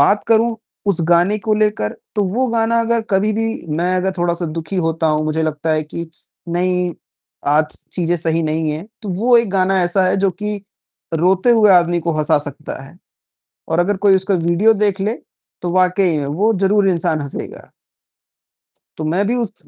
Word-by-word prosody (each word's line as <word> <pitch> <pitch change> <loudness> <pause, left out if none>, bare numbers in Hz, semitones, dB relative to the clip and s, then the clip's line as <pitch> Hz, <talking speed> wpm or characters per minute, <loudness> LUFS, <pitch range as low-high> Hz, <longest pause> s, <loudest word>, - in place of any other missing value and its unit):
बात 200 +9 +3
करूँ 225 0 +3 0.3
उस 200 -4 +2
गाने 175 +5 +3
को 215 +1 0
लेकर, 210 - 0 0.2
तो 210 -2 +1
वो 260 +1 +1
गाना 230 0 +1
अगर 230 0 +1
कभी 200 +2 +2
भी 225 +1 -1 0.3
मैं 180 +2 0
अगर 190 +1 0
थोड़ा-सा 170 0 0
दुखी 165 +4 -5
होता 165 -2 0
हूँ, 155 0 +1
मुझे 155 +1 -1
लगता 155 0 -2
है 155 0 +1
कि 160 +2 -7 0.4
नहीं, 180 +1 0 0.5
आज 150 +2 +2 0.2
चीजें 175 -1 0
सही 165 0 0
नहीं 155 0 -1
है, 155 +4 -4 0.2
तो 210 - -6
वो 225 +7 +3
एक 230 -4 0
गाना 190 0 +2
ऐसा 175 +2 +2
है 185 - +2
जो 195 0 +2
कि 210 +2 -4 0.6
रोते 185 +7 +2
हुए 220 -3 +5
आदमी 175 -1 +3
को 170 0 -1
हँसा 155 0 +3
सकता 145 -1 -7
है। 165 - -15 0.7
और 160 - 0
अगर 195 +3 +1
कोई 195 - +6
उसका 190 +1 0
वीडियो 170 +6 +3
देख 200 -2 0
ले, 210 +4 0 0.5
तो 175 - -2
वाक़ई 185 -2 +2
में 145 - -3
वो 190 +11 +1
ज़रूर 195 +1 +3
इंसान 170 -3 0
हँसेगा। 140 -1 -7 1.3
तो 155 - -4
मैं 175 +6 0
भी 240 - 0
उस 235 -5 -5
180 Hz, 185 wpm, -18 LUFS, 160-205 Hz, 1.3 s, कोई